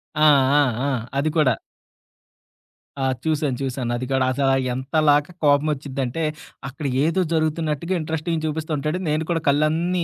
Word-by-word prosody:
ఆ! 150 - -1 0.4
ఆ! - - +6 0.2
ఆ! - - +1 0.3
అది 145 +3 +1
కూడా. 140 -5 +4 1.5
ఆ! - - -1 0.2
చూశాను, 150 -4 0
చూశాను. 130 -2 -2
అది 130 - -4
కూడా 130 -1 +2
అసల 135 +1 +1 0.2
ఎంతలాగా 145 +4 +2
కోపమోచ్చిద్దంటే, 145 -1 0 0.4
అక్కడ 145 +3 -7 0.2
ఏదో 165 +4 +1
జరుగుతున్నట్టుగా 160 +1 -1
ఇంట్రెస్టింగ్ 160 +1 -2
చూపిసస్తుంటాడు. 155 0 -2
నేను 155 +1 0
కూడా 165 -1 0
కళ్ళన్నీ 160 +5 +2
150 Hz, 125 wpm, -22 LUFS, 140-160 Hz, 1.5 s, ఆ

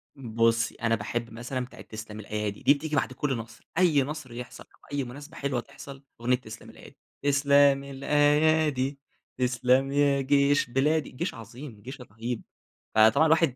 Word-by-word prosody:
بُصّي، 115 -2 +1
أنا 115 0 +1
باحب 115 +2 -4
مثلًا 125 +2 -4
بتاعة 130 - -13
تسلم 110 -1 -9
الأيادي، 105 -1 -4
دي 140 - +7
بتيجي 150 +1 -4
بعد 130 -1 0
كلّ 135 -2 -1
نصر، 115 +1 -10
أي 165 -6 +4
نصر 145 -4 -6
يحصل 125 +1 -8
أو - - -34
أي 140 -1 0
مناسبة 145 +6 -10
حلوة 140 -3 -1
تحصل، 140 +1 -12 0.2
أغنية 125 +1 +3
تسلم 110 -3 -10
الأيادي، - - -15 0.2
تسلم 140 0 +4
الأيادي 145 0 +2 0.4
تسلم 125 +2 +2
يا 140 -1 +3
جيش 140 -1 +3
بلادي. 150 +5 +1
جيش 170 +8 -4
عظيم 115 0 -10
جيش 130 +2 -9
رهيب، 115 +1 -5 0.5
فطبعًا 110 +8 +6
الواحد 160 -4 +3
135 Hz, 155 wpm, -27 LUFS, 120-145 Hz, 0.5 s, دي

